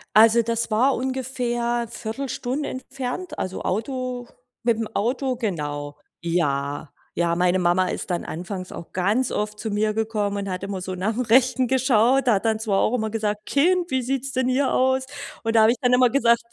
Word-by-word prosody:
Also, 225 +2 +7
das 230 0 -2
war 255 +5 +3
ungefähr 245 -2 -1
Viertelstunde 255 +4 -3
entfernt, 265 +6 -5
also 185 - -4
Auto 250 +3 -3 0.4
mit 235 -2 +2
'm 225 - -2
Auto 255 +4 0
genau. 145 - -3 0.2
Ja. 145 -4 -1 0.2
Ja, 170 0 +1
meine 180 +1 +2
Mama 180 +1 +2
ist 185 - -4
dann 175 - -1
anfangs 185 +2 -6
auch 170 - -9
ganz 205 +8 +1
oft 210 0 -2
zu 220 -1 -3
mir 215 +1 +1
gekommen 210 -2 -1
und 200 -1 -3
hat 185 +1 -4
immer 195 -1 -3
so 185 0 -4
nach 210 +5 -1
'm - - +1
Rechten 255 +1 +3
geschaut. 260 0 +3
Da 225 - +5
hat 195 - -2
dann 220 -1 +1
zwar 205 -3 +1
auch 230 - +2
immer 220 -3 0
gesagt: 210 -1 -2
„Kind, 350 +4 +2
wie 260 -1 +1
sieht's 270 +2 -2
denn 255 0 0
hier 260 +1 +2
aus?” 260 0 +2 0.4
Und 225 0 -1
da 220 - +7
habe 220 +1 +6
ich 240 - -1
dann 250 -1 +3
immer 250 -1 +5
gesagt: 235 -3 +3
225 Hz, 190 wpm, -23 LUFS, 195-255 Hz, 0.4 s, Also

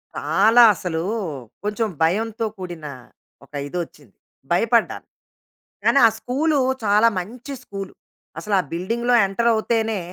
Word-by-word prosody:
చాలా 205 +11 +4
అసలు, 165 -3 -3 0.6
కొంచెం 210 +2 -1
భయంతో 220 +7 0
కూడిన 175 -5 -7 0.6
ఒక 140 - -32
ఇదోచ్చింది, 150 - -7 0.4
భయపడ్డాను. 230 +6 +1 0.8
కానీ 275 - +5
ఆ - - +4
స్కూలు 290 +5 0 0.3
చాలా 210 +3 +4
మంచి 240 +9 -8
స్కూలు. 195 -4 -7 0.5
అసలు 205 +4 -1
ఆ - - +3
బిల్డింగ్‌లో 235 +8 0
ఎంటర్ 235 +5 0
అవుతేనే 225 -1 0
210 Hz, 115 wpm, -22 LUFS, 180-235 Hz, 0.8 s, కానీ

